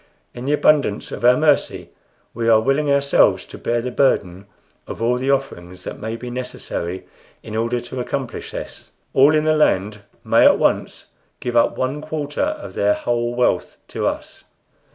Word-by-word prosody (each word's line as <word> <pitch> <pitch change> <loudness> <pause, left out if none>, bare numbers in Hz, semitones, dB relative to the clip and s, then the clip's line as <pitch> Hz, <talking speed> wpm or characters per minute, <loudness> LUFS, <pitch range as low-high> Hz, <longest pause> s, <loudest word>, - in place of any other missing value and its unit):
In 120 - -8
the 145 - +1
abundance 145 -8 +2
of - - -7
our 125 +1 +6
mercy 150 -2 +1 0.4
we 115 0 -1
are 110 -1 +6
willing 135 +6 +1
ourselves 140 0 +3
to - - -11
bear 120 0 -1
the 125 - -3
burden 100 -8 0 0.4
of - - -7
all 120 +2 +1
the 130 +2 -2
offerings 90 -10 -2
that - - -7
may 110 +1 -4
be 120 +1 -7
necessary 95 -7 -5 0.4
in 110 - -7
order 115 +2 0
to 125 +2 -7
accomplish 125 0 -4
this. - - -8 0.2
All 140 +4 +5
in 155 - +2
the 155 0 +3
land 105 -8 +1 0.2
may - - +4
at - - +6
once - - -1 0.3
give 120 -1 -4
up 115 - +3
one 130 +3 -2
quarter 150 -2 -4
of 300 +1 -3
their 105 0 +2
whole 120 0 -2
wealth 125 0 0
to - - -2
us." - - -5
125 Hz, 175 wpm, -20 LUFS, 115-140 Hz, 0.4 s, our